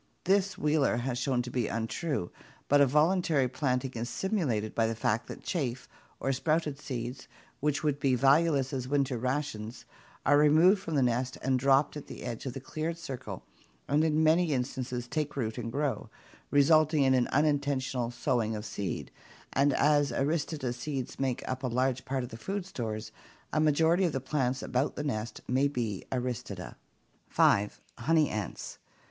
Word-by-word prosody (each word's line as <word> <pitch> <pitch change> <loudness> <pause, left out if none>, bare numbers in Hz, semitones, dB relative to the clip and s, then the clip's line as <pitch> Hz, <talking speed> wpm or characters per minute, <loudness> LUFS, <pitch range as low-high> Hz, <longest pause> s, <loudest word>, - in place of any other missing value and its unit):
This 195 0 +2
Wheeler 150 -5 +2
has 120 0 -2
shown 130 -2 0
to 125 - -7
be 120 -3 0
untrue, 115 - -2 0.4
but 145 0 +5
a 140 - +6
voluntary 155 -1 +3
planting 130 0 -1
is 120 +1 -4
simulated 125 - -1
by 115 -1 +2
the 115 - -2
fact 110 +1 0
that - - -9
chaff 130 -8 -2 0.3
or 135 - 0
sprouted 150 +2 0
seeds, 125 -2 -5 0.3
which 150 +1 0
would 145 -2 0
be 135 -3 +2
valueless 140 +1 +3
as 130 -2 -3
winter 135 -3 0
rations, 125 -3 -3 0.4
are 145 +2 +5
removed 160 +7 +5
from 165 -4 -4
the 135 - +3
nest 125 +1 0
and 130 -1 +2
dropped 135 +3 +3
at 150 - -7
the - - -9
edge 120 +2 -5
of 125 - -3
the - - -5
cleared 155 +4 -4
circle 130 - -7 0.4
and 145 +2 +3
in 160 0 +2
many 160 0 +4
instances 125 -1 -3
take 150 +1 -2
root 115 -3 -2
and 115 -1 -4
grow, 145 +1 -2 0.4
resulting 155 +1 +4
in 130 -1 +4
an 125 -2 +3
unintentional 140 -4 +1
sowing 120 -2 0
of 105 0 -5
seed, 100 -2 -4 0.4
and 140 +1 +3
as 145 +1 +3
Aristida 145 -3 -1
seeds 130 0 -5
make 130 -2 -1
up 130 0 -3
a 130 - -1
large 125 +1 0
part 130 -1 -1
of 120 - -6
the 115 - -8
food 195 - -4
stores, 110 - -5 0.4
a - - +2
majority 160 +4 +3
of 165 - 0
the 135 - 0
plants 130 -1 -1
about 130 +3 0
the 145 - -3
nest 110 -6 -3
may 130 +3 +3
be 115 -8 -3
Aristida. 120 -7 -4 0.5
5. 105 +1 +3 0.2
Honey 155 +4 +3
ants. 105 -4 -5
135 Hz, 175 wpm, -30 LUFS, 120-150 Hz, 0.5 s, a